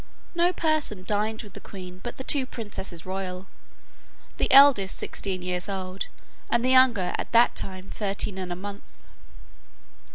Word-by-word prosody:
No 345 Hz, +1 st, +3 dB
person 310 Hz, -, 0 dB
dined 215 Hz, +3 st, -1 dB
with 205 Hz, -3 st, -13 dB
the -, -, -8 dB
queen 185 Hz, -2 st, -10 dB
but 240 Hz, -, -6 dB
the 260 Hz, -, -5 dB
two 265 Hz, -1 st, +1 dB
princesses 195 Hz, -8 st, -6 dB
royal, 185 Hz, 0 st, -4 dB, 0.9 s
the -, -, 0 dB
eldest 265 Hz, -9 st, +7 dB
sixteen 185 Hz, -2 st, -3 dB
years 180 Hz, +2 st, -2 dB
old, 190 Hz, -1 st, -4 dB, 0.4 s
and 235 Hz, +1 st, +2 dB
the -, -, +2 dB
younger 250 Hz, -8 st, +5 dB
at -, -, -4 dB
that 235 Hz, +1 st, +5 dB
time 185 Hz, 0 st, -7 dB
thirteen 200 Hz, -1 st, -2 dB
and 185 Hz, -1 st, -4 dB
a -, -, -2 dB
month. 200 Hz, +2 st, -7 dB
200 Hz, 155 wpm, -26 LUFS, 185-240 Hz, 0.9 s, eldest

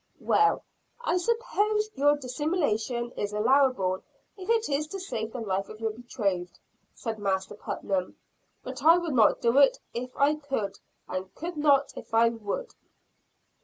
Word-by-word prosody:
"Well, 425 Hz, 0 st, +3 dB, 0.4 s
I 365 Hz, -7 st, 0 dB
suppose 430 Hz, 0 st, 0 dB
your 290 Hz, +2 st, +3 dB
dissimulation 255 Hz, -, -1 dB
is 205 Hz, -3 st, -4 dB
allowable 215 Hz, -5 st, +3 dB, 0.3 s
if 385 Hz, 0 st, -9 dB
it 460 Hz, -1 st, +3 dB
is 295 Hz, +1 st, 0 dB
to 390 Hz, +5 st, -6 dB
save 225 Hz, -, -4 dB
the 245 Hz, -, -5 dB
life 195 Hz, -2 st, -2 dB
of 215 Hz, -, -10 dB
your 225 Hz, -1 st, -1 dB
betrothed," 210 Hz, -6 st, -3 dB, 0.4 s
said 225 Hz, -2 st, -4 dB
Master 190 Hz, -2 st, -1 dB
Putnam, 195 Hz, -2 st, -3 dB, 0.5 s
"but -, -, -7 dB
I 330 Hz, +2 st, +8 dB
would 340 Hz, -4 st, -2 dB
not 225 Hz, -4 st, +4 dB
do 235 Hz, +3 st, +4 dB
it 280 Hz, -, +6 dB, 0.2 s
if 250 Hz, +2 st, -4 dB
I 285 Hz, +2 st, +4 dB
could 270 Hz, -10 st, -3 dB, 0.3 s
and 185 Hz, 0 st, -3 dB
I -, -, -26 dB
could 345 Hz, +2 st, -4 dB
not 285 Hz, -2 st, +3 dB
if -, -, -6 dB
I 230 Hz, +1 st, +6 dB
would." 225 Hz, -, -4 dB
255 Hz, 160 wpm, -28 LUFS, 215-310 Hz, 0.5 s, I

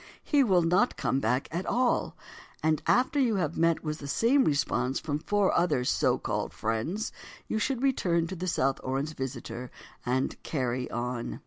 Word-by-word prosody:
He 290 Hz, -2 st, +3 dB
will 185 Hz, -7 st, +3 dB
not 180 Hz, +9 st, +2 dB
come 135 Hz, -, 0 dB
back 125 Hz, +1 st, 0 dB
at 175 Hz, +3 st, -3 dB
all. 245 Hz, 0 st, +1 dB, 0.5 s
And 155 Hz, -1 st, +2 dB
after 265 Hz, +4 st, +3 dB
you 240 Hz, -5 st, +3 dB
have 165 Hz, -5 st, -1 dB
met 165 Hz, 0 st, +2 dB
with 155 Hz, 0 st, -3 dB
the 140 Hz, -, -7 dB
same 240 Hz, -, +3 dB
response 135 Hz, -3 st, +1 dB
from 150 Hz, -1 st, -2 dB
four 205 Hz, +4 st, +1 dB
other 160 Hz, -7 st, +2 dB
so -, -, +2 dB
called -, -, -3 dB
friends, 115 Hz, -, -2 dB, 0.4 s
you 220 Hz, -, -1 dB
should 255 Hz, +3 st, -1 dB
return 175 Hz, -11 st, +2 dB
to 185 Hz, +3 st, -5 dB
the 185 Hz, +1 st, -4 dB
South 135 Hz, -5 st, +1 dB
Orange 135 Hz, +4 st, -2 dB
visitor 125 Hz, -1 st, -5 dB, 0.3 s
and 130 Hz, +2 st, -1 dB
"carry 130 Hz, -3 st, -2 dB
on." 120 Hz, 0 st, -3 dB
155 Hz, 175 wpm, -28 LUFS, 130-200 Hz, 0.5 s, He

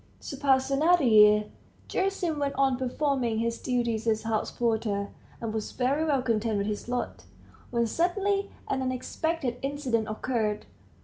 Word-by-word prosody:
So -, -, -7 dB
passed 265 Hz, -1 st, +2 dB
another 320 Hz, +4 st, +4 dB
year. 210 Hz, -3 st, +6 dB, 0.4 s
Gerasim 375 Hz, -5 st, -1 dB
went 280 Hz, -1 st, -1 dB
on 270 Hz, -1 st, +3 dB
performing 255 Hz, -2 st, 0 dB
his 230 Hz, +1 st, -1 dB
duties 235 Hz, -3 st, -1 dB
as 220 Hz, -1 st, +1 dB
house 220 Hz, -1 st, -1 dB
porter, 220 Hz, -4 st, -1 dB, 0.3 s
and 225 Hz, -2 st, -4 dB
was 220 Hz, -1 st, -4 dB
very 270 Hz, +5 st, +1 dB
well 280 Hz, -5 st, +1 dB
content 225 Hz, -2 st, 0 dB
with 200 Hz, -, 0 dB
his 210 Hz, +2 st, -4 dB
lot, 245 Hz, 0 st, -3 dB, 0.4 s
when 235 Hz, -1 st, +1 dB
suddenly 395 Hz, -, 0 dB, 0.2 s
an 265 Hz, -, -1 dB
unexpected 255 Hz, +1 st, -2 dB
incident 265 Hz, -6 st, -1 dB
occurred. 215 Hz, -1 st, -2 dB
250 Hz, 145 wpm, -28 LUFS, 220-280 Hz, 0.4 s, year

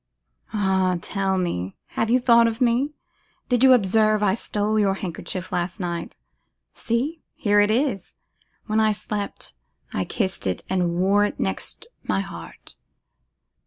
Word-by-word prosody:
'Ah! 190 Hz, -3 st, +1 dB
tell 195 Hz, +1 st, -1 dB
me, 95 Hz, -, -2 dB
have 225 Hz, -, -1 dB
you 250 Hz, +2 st, +4 dB
thought 235 Hz, -2 st, +5 dB
of 225 Hz, 0 st, -3 dB
me? 255 Hz, +4 st, +1 dB, 0.5 s
Did 245 Hz, 0 st, +2 dB
you 265 Hz, -, +8 dB
observe 215 Hz, -1 st, +3 dB
I 195 Hz, -2 st, +3 dB
stole 215 Hz, 0 st, 0 dB
your 195 Hz, -2 st, +2 dB
handkerchief 185 Hz, 0 st, -5 dB
last 175 Hz, +3 st, -2 dB
night? 170 Hz, -2 st, -4 dB, 0.6 s
See! 270 Hz, +8 st, -2 dB
here 205 Hz, -1 st, +3 dB
it 205 Hz, 0 st, +4 dB
is; 230 Hz, -, 0 dB, 0.5 s
when 215 Hz, 0 st, +1 dB
I 215 Hz, -1 st, +3 dB
slept, 205 Hz, 0 st, -5 dB, 0.4 s
I -, -, 0 dB
kissed 190 Hz, -, -2 dB
it 90 Hz, -, -2 dB
and 175 Hz, -2 st, +1 dB
wore 195 Hz, +3 st, +3 dB
it -, -, -4 dB
next 95 Hz, 0 st, -2 dB, 0.2 s
my 95 Hz, 0 st, 0 dB
heart. 85 Hz, -4 st, -10 dB
205 Hz, 145 wpm, -23 LUFS, 185-225 Hz, 0.6 s, you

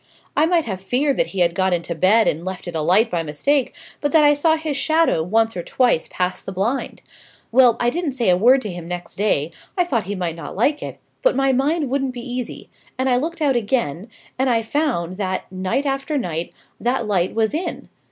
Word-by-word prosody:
I 310 Hz, -, +4 dB
might 335 Hz, -2 st, +2 dB
have 190 Hz, -4 st, -4 dB
feared 260 Hz, +8 st, 0 dB
that -, -, +2 dB
he 190 Hz, -, -3 dB
had 170 Hz, -1 st, +3 dB
got 190 Hz, 0 st, +1 dB
into 170 Hz, 0 st, -2 dB
bed 190 Hz, +7 st, +4 dB
and 160 Hz, +3 st, 0 dB
left 185 Hz, 0 st, -6 dB
it 175 Hz, -, -5 dB
alight 185 Hz, +9 st, +3 dB
by 170 Hz, -2 st, 0 dB
mistake, 245 Hz, -, 0 dB, 0.3 s
but 290 Hz, -, 0 dB
that 315 Hz, -2 st, +6 dB
I 290 Hz, 0 st, +6 dB
saw 315 Hz, +2 st, +2 dB
his 315 Hz, -2 st, -3 dB
shadow 315 Hz, -, +2 dB
once 225 Hz, +6 st, +1 dB
or 175 Hz, -, -2 dB
twice 240 Hz, -3 st, +1 dB
pass 180 Hz, 0 st, -2 dB
the -, -, -7 dB
blind. 210 Hz, +8 st, -2 dB, 0.5 s
Well, 245 Hz, -1 st, +5 dB
I 240 Hz, 0 st, +2 dB
didn't 330 Hz, -3 st, -2 dB
say 240 Hz, -6 st, 0 dB
a 180 Hz, -, +5 dB
word 250 Hz, +8 st, +5 dB
to 210 Hz, -, -4 dB
him 175 Hz, -1 st, -7 dB
next 175 Hz, -1 st, -6 dB
day, 175 Hz, -7 st, +1 dB, 0.3 s
I 360 Hz, -, +4 dB
thought 235 Hz, -, -1 dB
he 205 Hz, +2 st, -3 dB
might 175 Hz, -3 st, -3 dB
not 165 Hz, -, -8 dB
like 285 Hz, +9 st, +1 dB
it: -, -, -6 dB, 0.2 s
but -, -, +3 dB
my 270 Hz, 0 st, +2 dB
mind 290 Hz, +4 st, +1 dB
wouldn't 270 Hz, -1 st, 0 dB
be 245 Hz, +1 st, -7 dB
easy, 245 Hz, -1 st, -5 dB, 0.3 s
and 260 Hz, +1 st, 0 dB
I 250 Hz, -, +3 dB
looked 320 Hz, +4 st, -2 dB
out 275 Hz, -3 st, +3 dB
again, 215 Hz, -, -1 dB, 0.3 s
and 265 Hz, 0 st, +2 dB
I 230 Hz, -2 st, +2 dB
found 220 Hz, -, -1 dB
that, 185 Hz, -2 st, -3 dB
night 185 Hz, +9 st, -1 dB
after 275 Hz, +2 st, -1 dB
night, 170 Hz, -, -3 dB, 0.3 s
that 245 Hz, 0 st, 0 dB
light 190 Hz, -3 st, 0 dB
was 225 Hz, +3 st, +1 dB
in. 330 Hz, +4 st, -4 dB
230 Hz, 220 wpm, -21 LUFS, 185-275 Hz, 0.5 s, that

